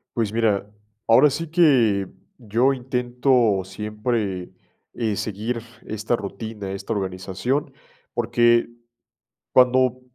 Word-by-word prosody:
Pues, 110 Hz, -3 st, -1 dB
mira, 105 Hz, -3 st, +1 dB, 0.4 s
ahora 130 Hz, +6 st, +6 dB
sí 165 Hz, +5 st, -4 dB
que 125 Hz, -, +4 dB, 0.3 s
yo 120 Hz, +3 st, +1 dB
intento 125 Hz, -4 st, +1 dB
siempre, 105 Hz, -1 st, -3 dB, 0.4 s
eh, 110 Hz, -3 st, -1 dB
seguir 110 Hz, +4 st, -3 dB, 0.2 s
esta 110 Hz, +2 st, -1 dB
rutina, 105 Hz, 0 st, -6 dB
esta 100 Hz, +4 st, -6 dB
organización, 100 Hz, +8 st, -2 dB, 0.4 s
porque 120 Hz, 0 st, +3 dB, 0.9 s
cuando 130 Hz, 0 st, +4 dB
115 Hz, 95 wpm, -23 LUFS, 105-125 Hz, 0.9 s, ahora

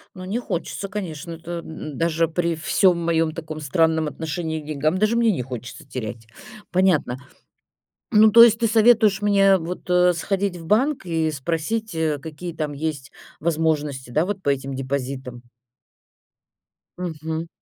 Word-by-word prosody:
Ну, 185 Hz, -, -8 dB
не 205 Hz, +6 st, -2 dB
хочется, 200 Hz, -2 st, -4 dB
конечно. 180 Hz, -5 st, -5 dB
Это 170 Hz, +1 st, -6 dB
даже 165 Hz, +2 st, -1 dB
при 170 Hz, +1 st, -1 dB
всём 175 Hz, +3 st, +2 dB
моём 165 Hz, -1 st, +1 dB
таком 155 Hz, -1 st, -7 dB
странном 160 Hz, +2 st, +1 dB
отношении 160 Hz, +1 st, -4 dB
к -, -, -14 dB
деньгам, 155 Hz, +3 st, 0 dB
даже 215 Hz, +4 st, +2 dB
мне 235 Hz, -1 st, +3 dB
не 170 Hz, -, -2 dB
хочется 125 Hz, +5 st, -8 dB
терять, 115 Hz, -3 st, -6 dB, 0.4 s
понятно. 180 Hz, -9 st, +2 dB, 1.0 s
Ну, 215 Hz, 0 st, +7 dB
то 230 Hz, +2 st, +10 dB
есть 230 Hz, -1 st, +7 dB
ты 230 Hz, -, +2 dB
советуешь 220 Hz, -2 st, +4 dB
мне 195 Hz, -1 st, +5 dB
вот, 180 Hz, +1 st, -6 dB
э, 180 Hz, 0 st, +4 dB
сходить 195 Hz, +2 st, -1 dB
в 165 Hz, -2 st, -10 dB
банк 245 Hz, -, +1 dB
и 160 Hz, -2 st, 0 dB
спросить, 165 Hz, +9 st, -3 dB
э, 160 Hz, -2 st, 0 dB
какие 160 Hz, +4 st, -7 dB
там 155 Hz, -2 st, -3 dB
есть 145 Hz, -2 st, -4 dB, 0.3 s
возможности, 150 Hz, -5 st, -1 dB
да, 155 Hz, +7 st, +1 dB
вот 200 Hz, -1 st, -4 dB
по -, -, -2 dB
этим 135 Hz, -1 st, -1 dB
депозитам? 130 Hz, -2 st, -4 dB, 1.6 s
Мгм. 160 Hz, -2 st, -4 dB
165 Hz, 150 wpm, -23 LUFS, 150-190 Hz, 1.6 s, то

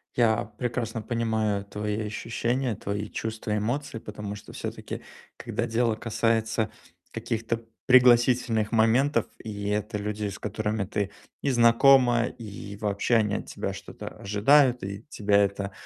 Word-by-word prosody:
Я 115 Hz, -3 st, +3 dB
прекрасно 120 Hz, -2 st, -2 dB
понимаю 110 Hz, -3 st, 0 dB
твои 105 Hz, +1 st, -3 dB
ощущения, 115 Hz, +2 st, -1 dB
твои 100 Hz, +1 st, -4 dB
чувства, 110 Hz, -1 st, -3 dB
эмоции, 120 Hz, +4 st, -2 dB
потому 105 Hz, -1 st, -6 dB
что 100 Hz, -, -11 dB
всё-таки, -, -, -6 dB, 0.4 s
когда 115 Hz, +2 st, -3 dB
дело 115 Hz, -1 st, +1 dB
касается 110 Hz, -1 st, 0 dB, 0.4 s
каких-то 115 Hz, 0 st, -2 dB, 0.2 s
пригласительных 120 Hz, -3 st, +5 dB
моментов. 115 Hz, +6 st, +3 dB, 0.2 s
И 100 Hz, -2 st, -5 dB
это 105 Hz, +1 st, -1 dB
люди, 105 Hz, 0 st, -3 dB
с 100 Hz, -, -8 dB
которыми 105 Hz, 0 st, -2 dB
ты 100 Hz, 0 st, -2 dB, 0.3 s
и 140 Hz, -, 0 dB
знакома, 120 Hz, 0 st, +5 dB
и 100 Hz, -3 st, -8 dB
вообще 105 Hz, +3 st, 0 dB
они 105 Hz, -2 st, +2 dB
от -, -, -5 dB
тебя -, -, -4 dB
что-то -, -, -9 dB
ожидают, 125 Hz, +5 st, +3 dB
и 100 Hz, +3 st, -6 dB
тебя 100 Hz, -4 st, +2 dB
это 100 Hz, 0 st, -2 dB
110 Hz, 130 wpm, -27 LUFS, 105-120 Hz, 0.4 s, пригласительных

